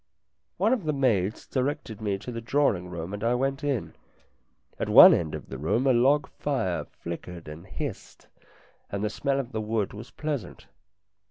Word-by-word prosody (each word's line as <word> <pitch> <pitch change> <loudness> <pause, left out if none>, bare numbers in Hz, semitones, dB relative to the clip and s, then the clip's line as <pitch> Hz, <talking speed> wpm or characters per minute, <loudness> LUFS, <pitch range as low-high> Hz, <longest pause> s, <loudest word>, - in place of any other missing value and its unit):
One 225 - +3
of 225 -10 -2
the 155 - +1
maids 110 -8 +1
directed 130 -5 -3
me 100 -2 -1
to 125 - -7
the 115 -1 -5
drawing 115 -8 +1
room, 85 +2 -6
and 105 +1 -5
I 120 +2 +2
went 135 +3 -1
in. 140 -6 -1 0.9
At - - -2
one - - +10
end 80 -3 0
of - - -9
the 65 - -6
room 110 - +1
a 130 - +5
log 140 +5 +3
fire 125 -12 -2
flickered 85 0 -8
and 80 +5 -9
hissed, 95 - -7 0.6
and 100 0 -3
the 105 - 0
smell 140 -1 0
of 130 -2 -4
the 110 - -2
wood 110 -2 -1
was 110 +4 -9
pleasant. 145 - -5
115 Hz, 180 wpm, -27 LUFS, 95-135 Hz, 0.9 s, one